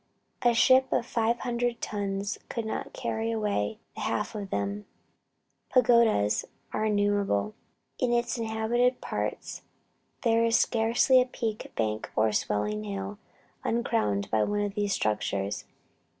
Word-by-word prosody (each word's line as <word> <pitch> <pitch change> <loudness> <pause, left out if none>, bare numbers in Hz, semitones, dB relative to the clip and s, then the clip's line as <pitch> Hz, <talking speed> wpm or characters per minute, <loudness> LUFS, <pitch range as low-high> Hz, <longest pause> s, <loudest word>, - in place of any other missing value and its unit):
A 240 -1 +4
ship 260 +2 +5
of - - +1
five 230 0 0
hundred 240 -1 -1
tons 200 -1 -3
could 230 -2 -3
not 220 - -4
carry 225 +1 -2
away 210 - -1 0.2
the - - -8
half 115 - -1
of 205 -3 -5
them." 100 - -3 0.8
Pagodas 235 - +4 0.3
are 215 - 0
innumerable. 205 - +1 0.5
In 250 - +1
the 240 -1 +1
inhabited 230 +3 +1
parts - - -4 0.6
there 230 -1 +3
is 230 0 +4
scarcely 235 +3 +4
a - - +1
peak, 225 -4 -4
bank, 110 -1 -1
or 110 0 +3
swelling 105 0 -1
hill, 100 0 -5 0.4
uncrowned 165 - 0
by 110 -1 +3
one 205 0 0
of 205 -1 -2
these 205 -1 -1
structures. 105 - -1
210 Hz, 135 wpm, -28 LUFS, -, 0.8 s, ship